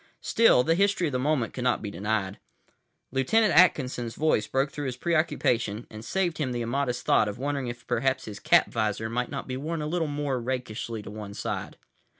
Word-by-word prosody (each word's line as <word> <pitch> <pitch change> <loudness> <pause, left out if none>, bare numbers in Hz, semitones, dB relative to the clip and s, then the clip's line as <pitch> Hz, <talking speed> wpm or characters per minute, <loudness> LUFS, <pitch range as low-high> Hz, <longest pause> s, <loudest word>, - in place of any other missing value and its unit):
Still, 230 - +5
the 165 - +3
history 195 -1 +2
of - - -3
the 125 - -1
moment 135 -3 0
could 125 - -4
not 125 -1 +2
be 105 - -4
denied. 100 0 -2 0.7
Lieutenant 205 - +3
Atkinson's 130 -8 +3
voice 155 -9 +1
broke 135 +1 0
through 145 -1 -4
his 125 -1 -4
preoccupation, 125 -9 0
and 110 0 -9
saved 175 +3 -1
him 130 -4 -1
the 120 -1 -2
immodest 125 +1 -2
thought - - +4
of 105 +1 -4
wondering 140 0 -2
if 120 0 -7
perhaps 130 +2 0
his 105 -2 -7
cap - - +5
visor 110 0 -1
might 125 +1 -1
not 140 - -5
be 130 0 -3
worn 160 +4 -3
a 150 - -3
little 165 +1 -1
more 145 -3 -2
rakishly 115 -3 -4
to - - -8
one 105 -1 -8
side. - - -4
130 Hz, 200 wpm, -27 LUFS, 115-150 Hz, 0.7 s, Still